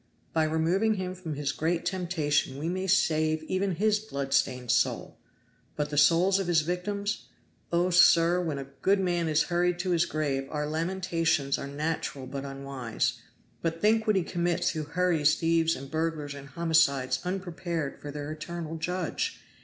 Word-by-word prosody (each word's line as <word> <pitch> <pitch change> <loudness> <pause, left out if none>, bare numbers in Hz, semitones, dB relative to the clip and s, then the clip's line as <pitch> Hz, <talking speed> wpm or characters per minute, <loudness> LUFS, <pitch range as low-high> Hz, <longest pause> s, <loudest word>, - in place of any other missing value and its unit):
By 160 -1 +3
removing 170 +8 +1
him 185 -1 -3
from 180 -4 -6
this 145 - -6
his 140 -1 0
great 165 +3 -1
temptation 165 -7 0
we 155 +4 -2
may 185 +2 -2
save 155 -4 +2
even 185 +2 -1
his 210 +3 +2
blood 140 -10 -4
stained 125 -3 +1
soul. 125 - 0 0.6
But 150 0 -2
the - - -2
souls 175 +6 +4
of 195 - -2
his 170 -3 +4
victims? 200 +5 -3 0.4
Oh, 175 +2 +2
sir, 175 0 +5
when 160 -5 -2
a 140 - -4 0.2
good 195 +1 +3
man 175 -3 0
is 150 0 +3
hurried 175 0 +1
to 180 +1 -2
his 170 -1 +3
grave 140 -3 -2
our 150 -1 -2
lamentations 165 -3 0
are 140 - -5
natural 145 -2 -3
but 135 +2 -5
unwise; 135 -4 -3 0.4
but 165 0 -2
think 220 +2 +3
what 215 - +4
he 190 - +2
commits 175 +1 0
who 155 - -3
hurries 165 -3 +2
thieves 165 0 +2
and 135 0 -9
burglars 160 -2 -2
and 140 -1 -10
homicides 140 -5 +2
unprepared 175 -5 -3
before 145 - -8
their 145 +1 -5
eternal 165 +1 -5
Judge. 180 +1 -2
165 Hz, 170 wpm, -28 LUFS, 150-180 Hz, 0.6 s, sir